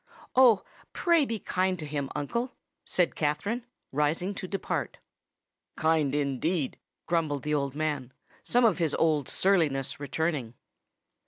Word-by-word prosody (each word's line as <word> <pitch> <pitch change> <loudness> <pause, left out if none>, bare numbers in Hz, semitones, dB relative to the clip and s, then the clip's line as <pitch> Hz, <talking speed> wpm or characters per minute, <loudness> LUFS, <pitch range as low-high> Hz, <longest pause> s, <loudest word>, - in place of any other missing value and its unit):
"Oh! 245 -6 +6 0.3
pray 340 -4 +3
be 230 -3 -2
kind 185 -2 0
to 155 - -6
him, 145 -2 -3
uncle," 235 - -2 0.3
said 180 -2 +2
Katherine, 165 +11 -1 0.3
rising 150 +7 0
to 190 -1 -6
depart. 195 +1 -3 0.8
"Kind 155 -3 +2
indeed!" 145 +2 -1 0.3
grumbled 155 -5 0
the 150 - -1 0.2
man, 150 -5 -2 0.3
some 245 0 +3
of 205 -5 +3
his 160 -4 +1
old 155 -4 +2
surliness 155 -10 +2
returning. 145 -4 -2
160 Hz, 120 wpm, -28 LUFS, 145-190 Hz, 0.8 s, Oh